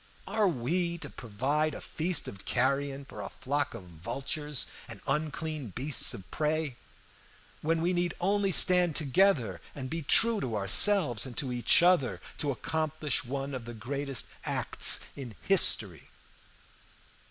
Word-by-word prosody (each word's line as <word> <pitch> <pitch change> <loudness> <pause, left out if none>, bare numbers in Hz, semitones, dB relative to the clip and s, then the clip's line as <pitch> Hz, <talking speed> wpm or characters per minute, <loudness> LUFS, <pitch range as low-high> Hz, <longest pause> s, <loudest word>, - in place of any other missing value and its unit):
Are 210 +1 +1
we 170 +4 -1
to - - -8
provide 140 +8 -2
a - - -7
feast 165 +1 0
of 100 - -9
carrion 135 +2 -1
for - - -9
a - - -6
flock 140 -1 -3
of 110 - -9
vultures 135 - -4 0.2
and 110 -3 -9
unclean 155 0 -3
beasts 140 +2 +4
of 95 - -12
prey, 155 -2 -1 0.9
when 165 +1 0
we 180 +2 +1
need 175 0 -1
only 195 +2 +1
stand 180 -3 +6
together, 135 - +1
and 130 -2 -6
be 165 0 -3
true 225 +9 +3
to 120 -4 -3
ourselves 120 - +3
and 125 - -10
to 130 -3 -2
each 120 +7 +3
other, 175 -8 +3 0.2
to 145 - 0
accomplish 150 +2 -2
one 135 +2 -5
of 125 -3 -6
the 120 0 -8
greatest 135 +3 -1 0.2
acts - - +3
in 125 -6 -8
history? 105 - +2
145 Hz, 145 wpm, -29 LUFS, 125-165 Hz, 0.9 s, stand